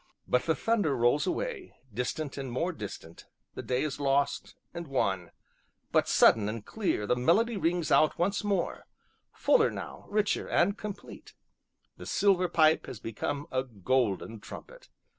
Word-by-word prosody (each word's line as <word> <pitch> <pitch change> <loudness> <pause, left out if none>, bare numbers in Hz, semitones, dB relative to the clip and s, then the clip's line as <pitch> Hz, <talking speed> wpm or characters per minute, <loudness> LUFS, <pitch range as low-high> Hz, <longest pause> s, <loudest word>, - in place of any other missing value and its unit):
But 125 - +1
the 160 - +3
thunder 205 - +1
rolls 120 +8 +2
away, 440 - -3 0.2
distant 135 +5 -3
and 135 -3 -5
more 170 +9 -1
distant 100 - -9 0.3
the - - -6
day 125 0 -1
is 150 -2 -3
lost, 140 0 0 0.2
and 170 -1 -6
won; 100 -10 -1 0.6
but, - - +3
sudden 105 -2 +5
and 110 -1 -6
clear, 200 - -1
the 125 - +2
melody 210 - +2
rings 175 -3 0
out 155 - +4
once 195 +5 0
more, 200 -4 -1 0.4
fuller 460 -2 +3
now, - - -8
richer, 210 0 0
and 200 +4 +2
complete; 210 -2 -9 0.6
the - - -9
silver 185 -3 +2
pipe 160 -1 +3
has 110 - -7
become 140 +7 -4
a 130 0 0
golden 115 -1 -1
trumpet. - - -11
150 Hz, 150 wpm, -29 LUFS, 125-195 Hz, 0.6 s, sudden